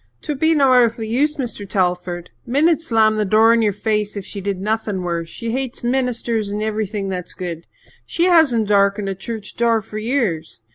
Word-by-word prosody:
"'Twould 295 -4 -4
be 320 +1 +3
no 275 -3 +4
airthly 235 -2 +3
use, 285 +7 +1
Mr. 230 -8 -5
Telford. 180 -2 -1
Min'd 300 +6 +2
slam 220 -7 +2
the 215 - +2
door 220 +3 +5
in 230 - +3
your 210 -2 +2
face 210 0 -2
if 195 - -5
she 200 - -7
did 195 -1 -3
nothing 210 -2 -2
worse. 170 -1 -3
She 230 +3 -5
hates 260 0 -3
ministers 240 -4 -1
and 210 +1 -3
everything 210 -2 -2
that's 180 -2 -5
good. 170 -3 -6 0.4
She 340 - -1
hasn't 305 - +4
darkened 200 0 +2
a - - -1
church 210 +2 -7
door 230 -1 +3
for 215 0 -7
years. 215 - -2
215 Hz, 190 wpm, -20 LUFS, 195-240 Hz, 0.4 s, door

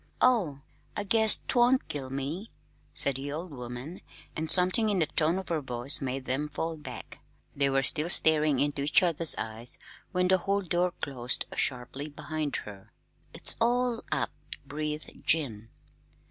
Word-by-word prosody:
"Oh, 190 - +1 0.4
I 205 - -2
guess 220 +1 +6
't - - -7
won't 250 +1 +3
kill 135 -3 -6
me," 140 +10 -5 0.4
said 140 -2 +2
the 140 +1 -6
old 165 +4 -6
woman; 125 +5 -8 0.3
and 160 0 -4
something 185 +6 +4
in 205 - 0
the 165 - +2
tone 160 +3 0
of 190 - -6
her 165 -3 -1
voice 125 +2 +3
made 130 0 -4
them 145 +4 -2
fall 160 +2 -4
back. 135 -6 -10 0.4
They 140 -1 +2
were 135 0 +1
still 150 +5 +3
staring 155 -5 +4
into 145 0 -1
each 150 +6 +3
other's 165 -2 +5
eyes 110 +2 -3 0.3
when 180 -1 +1
the 185 0 +3
hall 200 +2 -1
door 175 0 0
closed 125 -3 -2
sharply 130 +3 -3
behind 150 0 -4
her. 100 -2 -12 0.4
"It's - - +6
all 245 0 +1
up!" - - -1 0.3
breathed 150 +1 -5
Jim. 115 -9 0
150 Hz, 160 wpm, -28 LUFS, 135-180 Hz, 0.4 s, guess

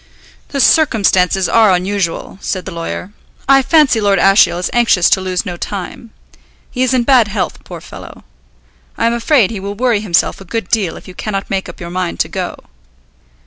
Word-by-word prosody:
"The 280 - -4
circumstances 195 - +3
are 220 -3 +4
unusual," 185 0 -2
said 185 -2 -4
the 190 - -6
lawyer. 170 +3 -6 0.4
"I 270 0 +5
fancy 275 -5 +3
Lord 200 -1 +2
Ashiel 195 -2 +4
is 180 - -3
anxious 230 -7 +3
to 190 - +3
lose 185 +1 -2
no 175 -3 -5
time. 200 +5 -6 0.6
He 250 - -4
is 255 0 +2
in 250 - +2
bad 245 -3 +4
health, 205 -1 -4
poor - - -10
fellow. - - -12 0.7
I - - 0
am 230 - +2
afraid 235 - +2
he 215 - -5
will 200 +1 -6
worry 240 -1 +1
himself 185 -2 0
a - - -8
good 195 0 -5
deal 205 -7 0
if - - -14
you 185 - -10
cannot 195 +1 -5
make 190 -1 -2
up - - -12
your 170 0 -7
mind 180 -1 -3
to - - -2
go." - - -4
200 Hz, 190 wpm, -15 LUFS, 185-235 Hz, 0.7 s, I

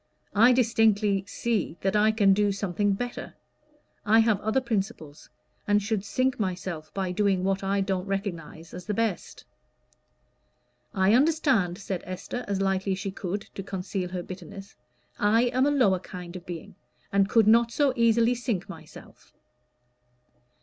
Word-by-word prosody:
I 230 +5 +6
distinctly 220 -5 +2
see 205 -6 -2
that 195 +1 0
I 215 +1 +4
can 205 -3 +4
do 205 +1 +2
something 200 +1 0
better. 245 +4 -5 0.7
I 215 +2 +4
have 220 -3 +3
other 220 +4 +1
principles, 195 - -4 0.4
and 205 0 +4
should 205 -1 -2
sink 255 +5 -1
myself 180 -5 -4
by 190 -2 -1
doing 195 -1 +1
what 195 0 0
I 195 +1 0
don't 190 -1 -2
recognize 170 -5 -5
as 180 0 -9
the 210 - -1
best." 225 -4 -3 1.5
"I 190 - +2
understand," 260 - +2
said 195 -3 -4
Esther, 185 +7 -6
as 200 -1 -1
lightly 195 0 0
as - - -3
she 195 0 -4
could, 195 +1 -4
to - - -6
conceal 190 -1 -4
her 180 -1 -4
bitterness. 195 +2 -10 0.4
"I 220 +3 +3
am 260 +2 +3
a - - +3
lower 210 -10 +3
kind 180 -1 -9
of 180 - -9
being, 170 -2 -7 0.4
and 200 0 +3
could 225 -2 +4
not 230 +2 +5
so 280 +1 +2
easily 230 0 +3
sink 235 -6 -3
myself." - - -13
200 Hz, 155 wpm, -26 LUFS, 190-225 Hz, 1.5 s, I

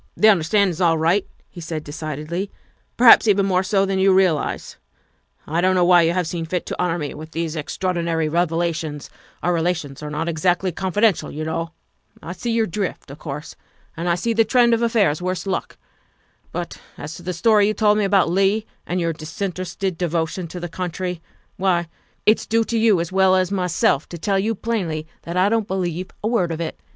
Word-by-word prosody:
" - - -41
The 215 - +6
understanding's 185 -1 +2
all 165 -2 +4
right," 170 +5 +2 0.2
he 175 - -11
said 160 -2 -5
decidedly, 155 +5 -4 0.2
' - - -37
' - - -44
perhaps 235 -1 +8
even 200 -1 +4
more 185 -2 +2
so 195 +1 +1
than 195 -1 -1
you 195 +1 +5
realize. 185 -5 +1 0.7
I 165 +3 -1
don 185 +1 +3
't - - 0
know 180 -1 +4
why 175 -1 +6
you 165 0 +2
have 180 -1 0
seen 165 0 -4
fit 180 +1 -2
to - - -4
honor 175 -1 0
me 150 -4 -4
with 155 +2 -10
these 165 -1 -2
extraor 180 +4 -2
dinary 165 -2 0
revelations 165 -2 -1 0.3
our 175 - +2
relations 165 -5 -2
are 150 - -5
not 155 +3 -3
exactly 175 +3 +1
confi 190 +4 -2
dential, 215 -7 +3
you 155 +2 -5
know. 165 +1 -3 0.5
I 170 - -8
see 235 - -5
your 225 -1 +2
drift, 190 -6 -4
of 145 - -11
course, 150 0 -7 0.4
and 170 +2 -2
I 170 - +3
see 230 +7 -1
the 225 0 +4
trend 235 +1 +4
of 230 - +1
affairs 210 -10 +2
worse 185 -1 -2
luck. 190 -1 -3 0.7
But - - -5 0.2
as 145 +2 -7
to - - -11
the 180 +1 -3
story 205 +3 +3
you 215 - 0
told 210 -1 +3
me - - +2
about 195 -1 +3
Leigh 195 +5 +2 0.2
and 180 - -1
your 165 -1 0
disinterested 180 +3 -4
devotion 170 0 -1
to 180 +2 -7
the 175 - -4
country, 180 0 -4 0.4
why, 175 -3 +1 0.4
it's 215 - +3
due 225 +1 +2
to 230 +1 -2
you 220 -5 +4
as 170 - -4
well 190 0 +4
as 185 0 +1
myself 180 -6 +1
to 170 - -7
tell 195 +4 0
you 220 +3 0
plainly 185 -9 -2 0.2
that 170 +2 -5
I 185 +2 +4
don't 220 -1 +1
believe 180 -1 -2
a - - +1
word 195 -8 +1
of 165 - -4
it. 165 -2 -4
180 Hz, 215 wpm, -21 LUFS, 165-195 Hz, 0.7 s, perhaps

